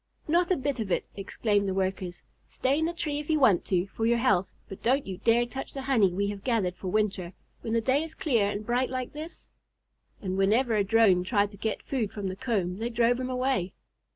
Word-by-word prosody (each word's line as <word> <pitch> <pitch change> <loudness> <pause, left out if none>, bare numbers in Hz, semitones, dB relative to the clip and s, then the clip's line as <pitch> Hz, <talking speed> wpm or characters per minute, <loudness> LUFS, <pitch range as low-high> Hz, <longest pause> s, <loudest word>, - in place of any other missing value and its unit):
"Not 345 +3 +2
a 370 - +2
bit 275 -1 -2
of 210 -4 -3
it!" - - +1
exclaimed 200 0 0
the 190 - -2
Workers. 185 -2 -2 0.2
"Stay 275 +3 0
in 320 - +1
the 335 - 0
tree 300 -4 -2
if 295 - -8
you 310 -1 +3
want 210 -10 +4
to 180 -1 +1
for 225 +3 -2
your 235 0 +3
health, 210 -7 +2 0.2
but 195 - -9
don't 265 +5 +2
you 190 -2 -6
dare 235 +1 +3
touch 265 +3 -7
the 270 - -5
honey 235 -9 +3
we 200 +3 -1
have 205 -1 -6
gathered 215 -8 0
for 190 - -7
winter, 195 -3 -1 0.3
when 225 - -3
the 230 - +2
day 265 +5 +2
is 320 0 -6
clear 240 - +1
and 205 +1 -4
bright 245 +2 +1
like 255 -1 -4
this." 310 +3 -8 0.7
And 190 -1 -3
whenever 225 +5 +3
a 205 - +3
Drone 195 -3 +4
tried 205 +1 +1
to 200 - -13
get 220 +2 -3
food 235 -7 -2
from 200 -2 -4
the 185 - -5
comb 195 -4 -2
they 230 +2 -2
drove 240 +1 +2
him 255 0 -3
away. 255 -8 0
225 Hz, 235 wpm, -28 LUFS, 195-260 Hz, 0.7 s, want